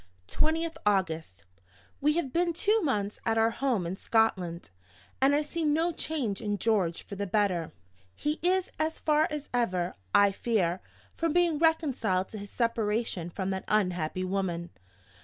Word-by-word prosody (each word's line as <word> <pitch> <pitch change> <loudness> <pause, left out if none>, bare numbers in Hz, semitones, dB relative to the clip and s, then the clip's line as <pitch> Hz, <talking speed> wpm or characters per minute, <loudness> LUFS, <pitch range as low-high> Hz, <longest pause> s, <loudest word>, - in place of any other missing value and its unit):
"20th 320 +1 0
August. 165 - 0 0.6
We 300 +2 +3
have 315 -6 -2
been 345 0 +2
two 425 +6 +2
months 210 - -1
at 225 -1 +1
our 225 +1 +4
home 240 -7 0
in 180 +3 -4
Scotland, 185 - 0 0.5
and 275 +2 +5
I 300 - +2
see 325 +3 -4
no 315 +3 +2
change 275 - -2
in 205 -1 -1
George 195 -7 +1
for 200 - -8
the 200 +1 -3
better. 185 -5 +1 0.4
He 300 +1 -2
is 365 +1 +1
as 315 +1 0
far 305 0 +2
as 300 -1 -5
ever, 185 -8 0 0.2
I 200 - +5
fear, 190 -4 0 0.3
from 330 -2 -1
being 345 -3 +3
reconciled 265 - +1
to 215 - -7
his 200 0 -8
separation 225 -6 -1
from 190 +2 -3
that 190 0 -3
unhappy 180 -4 0
woman. 185 -2 -2
225 Hz, 160 wpm, -29 LUFS, 185-305 Hz, 0.6 s, and